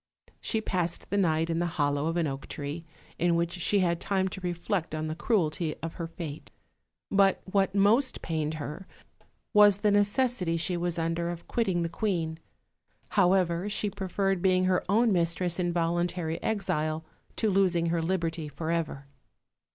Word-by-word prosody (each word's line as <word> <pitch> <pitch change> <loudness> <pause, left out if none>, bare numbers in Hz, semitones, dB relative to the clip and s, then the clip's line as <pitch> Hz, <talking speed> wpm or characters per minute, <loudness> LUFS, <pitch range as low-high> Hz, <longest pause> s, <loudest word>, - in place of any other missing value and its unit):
She 220 - -1
passed 175 -5 -2
the 200 - +1
night 165 -4 +2
in 165 0 -1
the 175 - +1
hollow 145 0 +1
of 165 +1 -1
an 170 - +2
oak 135 -2 -4
tree, 145 +4 -5 0.3
in 175 0 +3
which 170 0 0
she 185 +3 +1
had 170 -1 +1
time 190 -1 +1
to 190 - -8
reflect 175 -1 -2
on 155 0 -2
the 155 - -2
cruelty 165 -4 0
of 165 - -3
her 165 - -2
fate: 160 -3 -7 0.6
but 195 -1 +4
what 195 0 +1
most 220 +7 +3
pained 155 -1 -2
her 155 +5 -6 0.7
was 205 -2 +7
the 210 0 +2
necessity 205 -3 +1
she 175 +2 -1
was 175 0 -1
under 165 +1 -1
of 175 -1 -7
quitting 190 -7 0
the - - 0
queen; 165 -3 -2 0.7
however, 185 -1 +2
she 210 0 -1
preferred 195 -1 -1
being 185 -1 +3
her 185 0 +2
own 225 +2 +4
mistress 170 0 0
in 175 -1 +1
voluntary 170 -1 -1
exile 160 -7 -1 0.3
to 220 -2 +1
losing 185 -3 +3
her 170 0 +1
liberty 165 -2 -1
forever. 160 -2 -3
175 Hz, 165 wpm, -28 LUFS, 165-195 Hz, 0.7 s, was